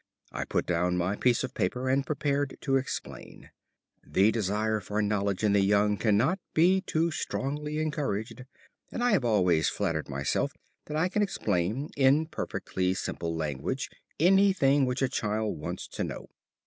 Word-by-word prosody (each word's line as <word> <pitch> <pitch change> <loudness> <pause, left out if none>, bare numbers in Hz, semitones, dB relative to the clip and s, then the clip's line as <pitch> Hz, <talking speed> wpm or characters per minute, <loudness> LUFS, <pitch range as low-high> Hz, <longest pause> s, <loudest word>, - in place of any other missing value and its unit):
I - - -3
put - - -1
down 90 +1 +1
my 90 +3 0
piece 120 +2 +2
of 130 - -3
the - - -15
paper 125 +1 0
and 135 +1 +2
prepared 140 -1 -1
to 135 -2 +1
explain. 135 -1 -5 0.5
The 100 +3 +3
desire 110 0 0
for 105 +2 -3
knowledge 100 -1 0
in 105 -2 +3
the 100 - +4
young 105 +1 +3
cannot 115 - +2 0.2
be 185 +4 +4
too 170 -2 0
strongly 150 0 -3
encouraged, 135 -6 -3 0.5
and 240 - -3
I 245 - +3
have 195 -10 +3
always 90 -8 +3
flattered 85 -7 -2
myself 70 0 -1 0.3
that 150 - -4
I 165 +3 +2
can 210 +3 0
explain 110 - -1
in 140 +3 +4
perfectly 95 - -2
simple 85 -3 -3
language 80 - -3 0.3
anything 175 -7 +4
which 125 +2 -1
a - - +3
child 105 -5 -2
wants - - -5
to - - -3
know. - - -6
115 Hz, 160 wpm, -28 LUFS, 100-150 Hz, 0.5 s, the